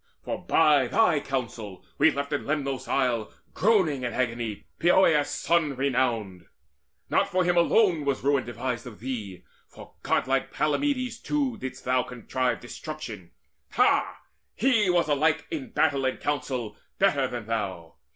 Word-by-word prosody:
For - - -5
by 145 -4 +4
thy 175 - +3
counsel 115 -8 -5
left 140 -2 +2
we - - +2
in - - -11
Lemnos' 140 -3 -2
isle 120 -5 0 0.2
Groaning 185 - +2
in 120 -1 -3
agony 120 -4 -2
Poeas' 170 -4 +4
son 160 -5 +1
renowned. 125 -8 0
And 85 - -26 0.6
not 200 - +2
for 185 -1 +1
him 175 0 +2
alone 175 -1 +3
was 140 -3 -1
ruin 140 -1 +2
devised 120 +1 -4
Of 110 -4 -11
thee; 110 -7 -6 0.2
for - - -14
godlike - - 0
Palamedes 255 - 0
too 280 -5 -1
Didst 130 - -7
thou 125 0 +2
contrive 125 +1 -2
destruction 120 - -8 0.4
ha, - - +2 0.3
he 225 -5 +3
was 175 -2 +2
Alike 150 +2 +2
in 290 -7 -4
battle 145 -11 +1
and 130 - -1
council 130 -7 -3 0.2
better 145 -9 +2
than 120 -3 -6
thou! 95 -8 -4
140 Hz, 145 wpm, -26 LUFS, 120-170 Hz, 0.6 s, by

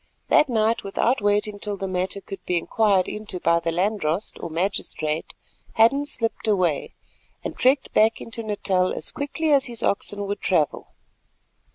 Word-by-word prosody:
That 300 - +5
night, 225 -1 +1
without 225 +5 0
waiting 205 0 +1
till 205 0 -4
the 195 - -3
matter 185 +2 -2
could 195 0 -9
be 180 - 0
inquired 195 +1 +2
into 210 -3 -5
by 170 0 +3
the 165 0 -2
landdrost 185 0 -1
or - - -4
magistrate, 160 -3 -2 0.4
Hadden 275 +6 +4
slipped 225 -4 -2
away, 180 -8 +1 0.5
and - - -5
trekked 265 +2 +2
back 220 +1 +4
into 230 0 -6
Natal 195 -4 0
as - - -3
quickly 300 +2 -2
as 280 -1 +4
his 235 -2 -5
oxen 205 0 0
would 200 0 -4
travel. 160 -6 0
205 Hz, 160 wpm, -24 LUFS, 185-225 Hz, 0.5 s, That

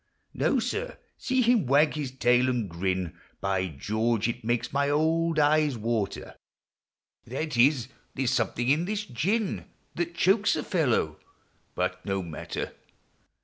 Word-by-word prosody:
No, - - +1
sir! 425 - -2
— - - -43
see 260 -1 +1
him 230 - +3
wag 145 +4 +4
his 150 -3 -3
tail 125 0 +3
and 120 -5 -1
grin! 90 0 -2 0.2
By 95 -1 0
George! 110 - 0
it 120 0 -4
makes 120 +2 -1
my 140 0 +2
old 160 +2 +1
eyes 150 -2 +3
water! 110 -3 -3 0.4
— - - -43
That 145 +4 -3
is, 125 0 +4 0.3
there 135 - -1
's 120 - +2
something 120 -1 0
in 155 +5 +3
this 210 +2 -2
gin 195 - -1 0.3
That 170 0 -3
chokes 200 +5 +3
a - - -2
fellow. 125 - 0 0.6
But 90 0 -2
no 95 -2 -2
matter! 80 -2 -5
130 Hz, 150 wpm, -27 LUFS, 110-165 Hz, 0.6 s, wag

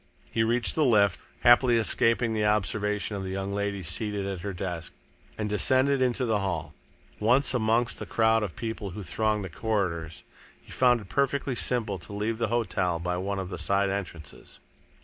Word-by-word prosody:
He 110 - 0
reached 115 0 +1
the 155 - +2
lift, 105 -7 +3 0.2
happily 120 0 +6
escaping 115 +1 +2
the 110 -1 0
observation 105 0 0
of 100 - -4
the 95 - -5
young 95 +1 -3
lady 100 -1 -2
seated 100 +4 -2
at 95 -3 -4
her 100 - -4
desk, 90 -3 -5 0.4
and 105 - -2
descended 130 +7 +2
into 125 0 +1
the 110 -3 +1
hall. 85 -6 -3 0.5
Once 125 +7 +3
amongst 115 0 +1
the - - -6
crowd 110 0 +3
of 100 -6 -4
people 110 -3 -5
who 105 - -5
thronged 105 +4 0
the - - -6
corridors, 85 -7 -2 0.4
he - - -18
found 125 -2 +3
it 95 - -13
perfectly 140 +1 0
simple 115 -5 -1
to 100 - -9
leave 110 +2 -2
the 115 - +1
hotel 100 -6 0
by 90 +1 -2
one 100 +2 -3
of 95 -2 -4
the 90 -3 -6
side 100 +3 +1
entrances. 85 -6 -7
105 Hz, 185 wpm, -27 LUFS, 95-115 Hz, 0.5 s, happily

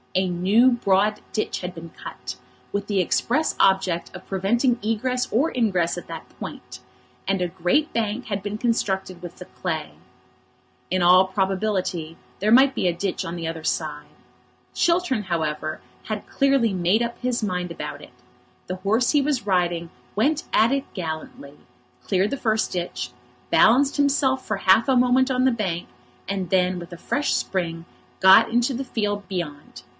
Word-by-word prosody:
A 185 0 +2
new 195 +8 +4
broad 210 -2 +2
ditch 215 - -2
had 180 0 -5
been 165 -1 -10
cut, - - -8 0.4
with 200 0 -2
the 200 -2 0
express 250 - +1
object 190 -3 +2
of 185 0 -11
preventing 235 +6 +1
egress 250 +4 -1
or 275 +9 +2
ingress 185 -8 +1
at 175 - -8
that - - -8
point; - - -8 0.5
and 195 -1 0
a 180 - +1
great 180 - 0
bank 225 +2 -1
had 200 -3 -3
been 205 +1 -3
constructed 190 -6 -1
with 175 -1 -9
the - - -9
clay. - - -4 1.0
In 185 0 0
all 180 +2 +6
probability 190 -4 -1 0.2
there 210 +2 +1
might 265 +3 +6
be - - +1
another 175 -1 -1
ditch 195 -1 -2
on 165 - -5
the 165 -1 -4
other 165 -1 -5
side. 150 -2 -2 0.7
Chiltern, 335 -10 +1
however, 155 -3 -2 0.3
had 215 -1 -5
clearly 275 -6 +2
made 185 +5 +2
up 235 0 -4
his 250 -1 -1
mind 180 -3 -2
about 150 -3 -6
it. - - -13 0.6
The 185 - -4
horse 215 +6 +1
he 295 - +4
was 275 -5 -1
riding 175 -3 0 0.2
went 285 +9 +1
at 225 +3 +4
it 275 -1 -2
gallantly, 160 -5 -6 0.5
cleared 195 +2 +1
the 280 - -1
first 220 -3 0
ditch, 175 -8 -4 0.4
balanced 270 +5 +5
himself 275 -2 +2
for 215 - -2
half 195 +6 +4
a 260 - +4
moment 255 +2 +3
on 255 0 +2
the 260 - +4
bank, 190 -7 -2 0.4
and 190 -3 -3
then, 185 0 +2
with 175 0 -10
a 175 - -8
fresh 290 +10 -1
spring, 170 -3 -2 0.3
got 190 +4 +7
into 240 +3 +1
the 260 +2 -3
field 205 -5 -2
beyond. 150 -9 -6
195 Hz, 170 wpm, -23 LUFS, 180-240 Hz, 1.0 s, got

